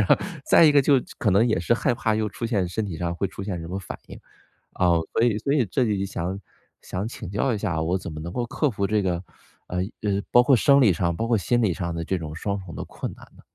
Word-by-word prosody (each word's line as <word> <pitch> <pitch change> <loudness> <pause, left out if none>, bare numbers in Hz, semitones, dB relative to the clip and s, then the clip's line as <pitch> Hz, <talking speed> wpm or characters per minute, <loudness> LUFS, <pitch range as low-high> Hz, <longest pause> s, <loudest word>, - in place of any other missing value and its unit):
然 - - +3
后 - - +7 0.3
再 - - +6
一 150 - +7
个 145 -1 +5
就 140 - +4 0.2
可 105 - +2
能 100 +5 +4
也 110 - +1
是 85 - +1
害 120 +1 +1
怕 110 -2 0
又 110 -1 0
出 105 - -7
现 105 -5 0
身 105 +5 -2
体 95 -5 -5
上 85 0 -2
会 95 +3 -1
出 95 - -8
现 95 -4 -3
什 80 - -7
么 95 +2 -3
反 95 - -7
应。 - - -10 0.6
啊， 90 - +2 0.2
所 115 - +2
以 115 -3 +3
所 140 - -2
以 140 -5 +3
这 115 +7 0
里 105 -4 0
就 100 - -1
想 95 0 -4 0.4
想 95 +4 -4
请 105 -6 -8
教 115 +6 0
一 - - -1
下， 90 -6 -1
我 85 +4 0
怎 85 -3 -7
么 75 - -7
能 85 +2 -6
够 120 +5 -2
克 145 +5 0
服 100 -4 -2
这 105 +1 +1
个 95 -3 0 0.5
呃， 90 - -4 0.3
呃， 100 -1 0
包 120 - +6
括 135 +2 +5
生 140 +4 +5
理 110 -8 +5
上、 85 0 0
包 115 - -2
括 115 0 +2
心 120 +4 +1
理 100 -5 +2
上 85 0 -4
的 85 - -3
这 95 - -1
种 80 -1 -6
双 100 +4 -2
重 90 -3 -10
的 - - -5
困 - - -6
难 - - -14
呢？ - - -17
100 Hz, 305 characters per minute, -24 LUFS, 90-115 Hz, 0.6 s, 后